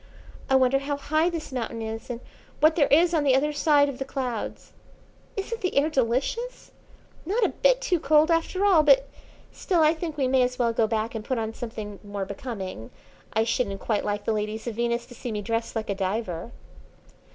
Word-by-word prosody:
I 265 - +4
wonder 265 +1 +4
how 285 +1 -3
high 310 +4 +1
this 330 -4 -5
mountain 235 -2 -3
is, 225 +3 -6
and 240 -1 -5 0.4
what 315 +1 +5
there 290 -5 +4
is 335 +4 +4
on 315 -3 +2
the 270 -2 +4
other 295 +3 +1
side 290 -1 +4
of 275 -3 -5
the - - -1
clouds. 255 -4 -4 0.7
Isn't 450 +4 -3
the 365 - -1
air 300 +3 +3
delicious! 275 - -1 0.5
Not 420 +8 0
a - - +2
bit - - +2
too 370 -9 +1
cold 305 +3 +4
after 335 +4 +1
all 370 -6 +6
but, 280 -2 +5 0.4
still, 355 -5 0
I 310 0 +5
think 320 -2 -5
we 270 -3 +1
may 260 0 +3
as 250 0 0
well 235 -2 +1
go 225 -1 +2
back 220 0 -1
and 220 -2 -5
put 260 +3 -2
on 225 -1 -2
something 215 -4 -7
more 205 -1 -4
becoming. 190 - -6 0.4
I 220 - +3
shouldn't 225 -3 -1
quite 215 0 -1
like 205 0 -2
the 225 - +1
ladies 215 +1 -3
of 235 - -3
Venus 235 +1 -1
to 245 - -13
see 245 0 -6
me 210 -1 -3
dressed 230 +2 -2
like 220 -2 -2
a - - +1
diver." 195 0 -3
255 Hz, 210 wpm, -26 LUFS, 225-310 Hz, 0.7 s, all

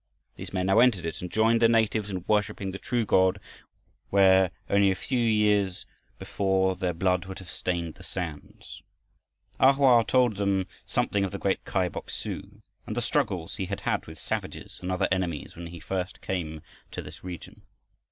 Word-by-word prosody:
These - - -8
men 95 -1 -1
now 95 +3 +4
entered 115 -9 +4
it 80 - -4
and 90 - -6
joined 115 +1 +3
the 115 - +6
natives 110 -2 +2
in 95 -2 -4
worshiping 105 -2 0
the 95 - -7
true 120 -2 -1
God, 95 -2 +3 0.7
where, 95 -1 +5 0.2
only 100 0 +4
a 95 - +1
few 125 +7 -2
years 105 -4 +2 0.3
before, 95 -1 +1
their 90 -2 -2
blood 90 +1 +1
would 95 0 -7
have 95 - -10
stained 85 -3 -2
the - - -15
sands. 85 -6 -7 0.8
A 135 +1 +7
Hoa 130 -4 +5
told 125 -4 +2
them 100 -2 +1 0.2
something 100 -1 +1
of 95 - -1
the 100 - -4
great 95 -1 0
Kai 95 -2 +1
Bok 85 - -7
su - - -6 0.2
and - - -4
the - - +3
struggles - - -1
he - - -2
had - - -4
had - - -1
with 80 0 -10
savages - - -5
and 90 +1 -3
other 95 +1 +1
enemies, 90 -5 -2
when 85 0 -7
he 85 0 -9
first 90 +2 -4
came 80 -4 -4 0.3
to - - -6
this - - -11
region. 90 -2 -8
95 Hz, 185 wpm, -27 LUFS, 90-105 Hz, 0.8 s, A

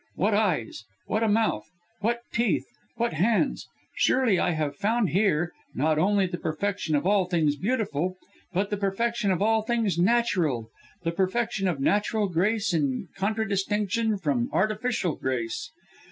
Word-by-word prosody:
What 205 +4 +1
eyes, 180 - 0 0.2
what 215 - -1
a 225 - +2
mouth! 220 +1 +1 0.3
what 235 +3 0
teeth! 230 -2 +1 0.3
what 235 -5 -1
hands! 220 - +1 0.3
Surely 245 -8 +3
I - - +2
have 155 -4 -1
found 215 0 +1
here, 175 -2 +2 0.2
not 155 0 +2
only 195 +3 +3
the 175 -1 -4
perfection 165 0 -1
of 145 - 0
all 200 -1 +3
things 165 -5 +1
beautiful, 185 - -1 0.3
but 195 +3 -1
the 205 - 0
perfection 210 +2 0
of 190 +1 +1
all 220 +1 +3
things 220 -5 0
natural, 175 - +1 0.3
the 165 - 0
perfection 195 +2 0
of 170 -6 -1
natural 205 +7 +1
grace 200 +3 +1
in 145 +1 -1
contradistinction 210 +1 0
from 140 -10 0
artificial 215 - 0
grace. 120 -4 -3
195 Hz, 145 wpm, -26 LUFS, 165-220 Hz, 0.3 s, Surely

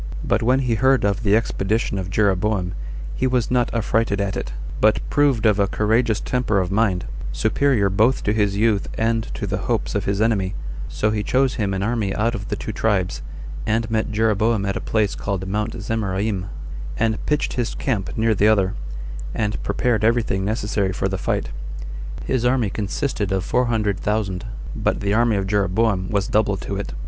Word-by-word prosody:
But - - +1
when 130 +4 +3
he 125 -3 +1
heard 130 +1 +3
of 100 +1 +1
the 105 -2 +3
expedition 110 -2 0
of 95 -1 -4
Jeroboam, 95 -1 +1 0.4
he 130 - 0
was 125 -2 0
not 125 -1 +2
affrighted 115 -2 +1
at 100 -1 -1
it, - - -4 0.3
but 110 0 +4
proved 140 -6 +3
of 105 -2 +4
a 100 - +3
courageous 110 +2 +2
temper 125 -5 0
of 90 0 -1
mind, 100 -3 +1 0.3
superior 110 - +2
both 110 +7 +2
to 105 - +1
his 105 -2 +1
youth 105 -2 +2
and 115 0 +1
to - - -3
the - - -2
hopes - - 0
of - - -1
his 100 0 0
enemy; 105 -4 +1 0.3
so 105 - 0
he 105 -1 0
chose 130 +4 +2
him 105 -4 -1
an 95 0 -1
army 105 -3 0
out 115 +2 +1
of 100 -3 -5
the - - -2
two - - -5
tribes, 100 -5 0 0.5
and 110 +1 0
met 110 0 0
Jeroboam 110 -1 +2
at 100 - -1
a - - -2
place 110 -3 +1
called 95 -1 -3
Mount 105 +2 -2
Zemaraim, 100 -2 -1 0.5
and 110 -1 0
pitched 150 0 +1
his 120 -2 -2
camp 110 -8 -2
near 110 0 +3
the 105 0 +3
other, 100 -3 +3 0.6
and 105 -1 -1
prepared 115 -4 0
everything 110 -4 +2
necessary 105 -2 0
for 95 - -1
the 95 0 -3
fight. - - -1 0.8
His 130 -3 0
army 125 -4 +2
consisted 105 0 -2
of 95 -1 0
four 125 0 +2
hundred 105 -5 0
thousand, 100 -4 -1 0.3
but - - 0
the 100 0 0
army 115 0 +3
of 100 -1 0
Jeroboam 100 0 +1
was 100 -2 0
double 105 -2 +2
to 100 - -4
it. 100 - -4
105 Hz, 190 wpm, -22 LUFS, 100-115 Hz, 0.8 s, but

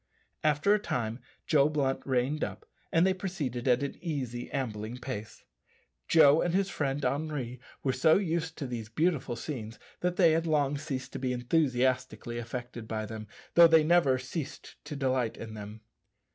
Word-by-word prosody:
After 155 +6 +3
a 210 - +3
time 115 - -2 0.3
Joe 145 -2 +4
Blunt 140 -3 0
reined 135 +4 +1
up, - - -5 0.3
and 165 +2 +4
they 190 - +3
proceeded 155 - -4
at 125 +2 +4
an 140 - -4
easy 130 -8 -3
ambling 115 -3 -3
pace. 120 -4 -7 0.6
Joe 155 -1 +6
and 175 0 0
his 195 0 +1
friend 140 -1 -1
Henri 135 -3 -2 0.2
were 130 - +1
so 155 +5 +5
used 165 -4 -2
to 145 - -4
these 115 -4 -5
beautiful 150 -1 0
scenes 115 -3 -6 0.2
that 180 0 0
they 170 -4 +5
had 165 +1 +1
long 145 -2 +2
ceased 140 -3 -5
to 135 - -4
be 130 -1 -1
enthusiastically 125 -2 0
affected 120 -1 -6
by 110 -1 -3
them, 110 0 -7 0.3
though 170 0 +9
they 160 -1 +6
never 155 -5 +4
ceased 135 +3 -6
to 150 0 -6
delight 130 -4 0
in 110 -1 -7
them. 105 +1 -8
135 Hz, 170 wpm, -30 LUFS, 120-160 Hz, 0.6 s, though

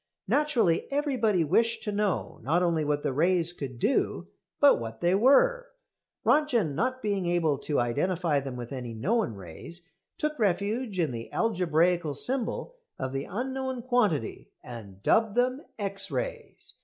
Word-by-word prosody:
Naturally 275 - +1
everybody 250 - +1
wished 225 +9 +1
to 210 - -2
know 205 -3 -1
not 170 +6 +1
only 165 -3 +1
what 145 0 -1
the - - -1
rays 175 +3 +2
could 135 -7 -6
do, 230 - 0 0.3
but 285 -2 +6
what 115 -1 -7
they 175 +1 +2
were. - - +4 0.6
Röntgen, 240 - +2
not 255 - -1
being 200 -4 -1
able 165 -5 +1
to 145 0 -1
identify 150 +6 0
them 135 -2 -6
with 120 +1 -7
any 125 -3 -6
known 200 - 0
rays, 100 - -9 0.3
took 305 -2 -2
refuge 205 +2 0
in 165 -6 +1
the 115 -1 -7
algebraical 175 -6 +1
symbol 255 - 0 0.2
of 130 - -4
the 135 0 -3
unknown 260 +3 -4
quantity 240 - 0
and 100 -6 -10
dubbed 220 -2 +3
them 255 +3 +1 0.2
X 200 -2 0
rays. - - -5
185 Hz, 150 wpm, -28 LUFS, 145-245 Hz, 0.6 s, but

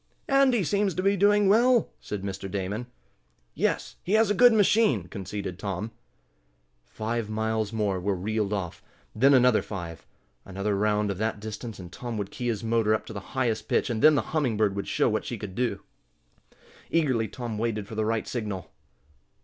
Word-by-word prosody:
"Andy 270 -6 +4
seems 195 +2 +1
to 185 - -1
be 200 +1 +3
doing 205 +1 +4
well," 235 +3 +4
said 105 -2 -6
Mr. 95 0 -5
Damon. 100 +5 -3 0.7
"Yes, - - -1
he 190 - -2
has 220 -1 +4
a - - +4
good 245 +4 +7
machine," 205 - +3
conceded 95 0 -6
Tom. 100 +2 -4 1.0
Five 110 - -3
miles 110 -1 -1
more 105 -4 0
were 100 +2 0
reeled 105 +2 -1
off. 95 -5 -3 0.3
Then 135 +5 +5
another 125 -4 +5
five. 90 -5 -7 0.4
Another 100 +2 -2
round 105 0 +1
of 95 - -5
that 110 -1 -1
distance 110 +1 -6
and 90 -2 -10
Tom 120 -2 -5
would 100 -1 -4
key 120 - -4
his 115 -2 -1
motor 110 -1 +2
up - - -5
to - - -8
the 100 - -4 0.2
highest 110 -4 0
pitch, - - +1
and 110 - -2
then 155 +1 +7
the 140 - +1
Humming 135 -9 +1
Bird 105 -2 +2
would 100 - -4
show - - +2
what - - 0
she - - -5
could 100 -3 -7
do. 110 -2 -1 1.1
Eagerly 130 -9 +1
Tom 115 -4 -5
waited 110 -3 -2
for - - -9
the 110 0 0
right 110 0 -1
signal. 105 -7 -4
110 Hz, 185 wpm, -27 LUFS, 100-130 Hz, 1.1 s, good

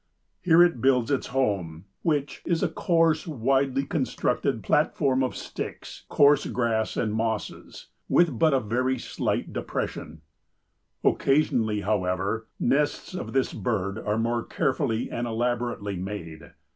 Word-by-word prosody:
Here 175 -1 +6
it 170 -10 +1
builds 130 -1 +3
its 135 - 0
home, 100 -10 -1 0.2
which 145 -3 -1
"is 170 -2 0
a - - +3
coarse, 165 -2 +1
widely 135 -1 +1
constructed 140 -4 -1
platform 130 -1 +2
of 130 - -1
sticks, - - -7
coarse 145 0 +4
grass 115 -3 -1
and 110 -2 0
mosses, 110 -1 -4 0.2
with 175 -1 +3
but 160 -1 +5
a 135 - +3
very 130 +4 0
slight 120 - -3
depression. 75 0 -4 0.8
Occasionally, 115 -7 +2
however, 100 +2 -1
nests 145 +7 0
of 180 - -5
this 135 -1 +1
bird 100 -2 -2
are 105 0 -1
more 115 +1 0
carefully 130 -4 -1
and 120 +1 -2
elaborately 120 -3 -2
made. 85 -4 -7
120 Hz, 130 wpm, -26 LUFS, 105-140 Hz, 0.8 s, Here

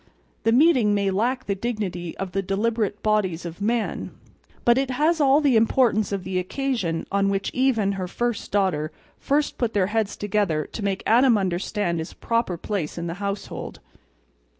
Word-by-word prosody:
The 225 - +4
meeting 250 -6 +4
may 200 -1 +1
lack 245 +6 0
the 200 - 0
dignity 195 -6 -4
of 195 -2 -4
the 195 +2 0
deliberative 210 +2 -1
bodies 195 -6 +1
of 170 +3 -7
man; 230 +2 -1 0.6
but 240 +2 +5
it 270 -1 -1
has 310 +5 +2
all 280 +1 +5
the 280 -5 +3
importance 220 -2 +3
of 195 -2 -2
the 185 -1 -1
occasion 185 -5 -2
on 195 0 +2
which 195 0 -1
Eve 260 -1 +2
and 200 -2 +1
her 190 -2 -3
first 240 +4 -2
daughter 180 -6 +1 0.3
first 290 +1 0
put 235 -3 -1
their 195 -2 +3
heads 220 -3 0
together 200 -7 0
to 220 - -5
make 195 -1 -1
Adam 240 +1 +5
understand 185 -1 -1
his 160 - -6
proper 230 -6 -1
place 175 -4 -3
in 170 - -3
the 170 - -3
household. 200 0 -5
205 Hz, 175 wpm, -24 LUFS, 190-240 Hz, 0.6 s, but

